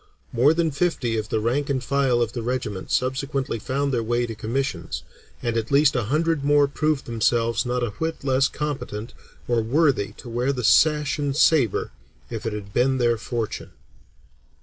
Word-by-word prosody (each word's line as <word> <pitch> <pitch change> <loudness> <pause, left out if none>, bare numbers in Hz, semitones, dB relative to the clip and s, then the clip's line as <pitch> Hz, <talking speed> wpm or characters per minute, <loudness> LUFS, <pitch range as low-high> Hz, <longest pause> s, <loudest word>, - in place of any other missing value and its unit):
More 125 +5 +5
than 165 -1 +1
fifty 140 -6 0
of 110 -1 -3
the 110 - 0
rank 130 +7 0
and 130 -2 0
file 135 -4 +2
of 115 0 -4
the 120 - -3
regiment 115 -5 -3
subsequently 130 -1 -1
found 140 +5 -1
their 120 - +1
way 120 +2 0
to 115 - -5
commissions, 110 - -3 0.4
and 120 -1 -1
at 115 -1 -1
least 140 0 +4
a 120 -4 0
hundred 155 +4 0
more 145 0 +4
proved 150 0 -1
themselves 115 +1 +1
not 125 0 -1
a 120 - -1
whit 160 +11 -4
less 135 0 +3
competent 130 -7 -5 0.3
or 120 -1 +2
worthy 130 -2 +1
to 125 - -12
wear 120 +3 0
sash 150 +4 +4
and 145 -1 -1
saber 145 -9 +3 0.4
if 115 0 -4
it 110 - -2
had 100 -1 -7
been 130 +2 +2
their 120 -2 +2
fortune." 115 -1 -4
125 Hz, 175 wpm, -24 LUFS, 115-140 Hz, 0.4 s, More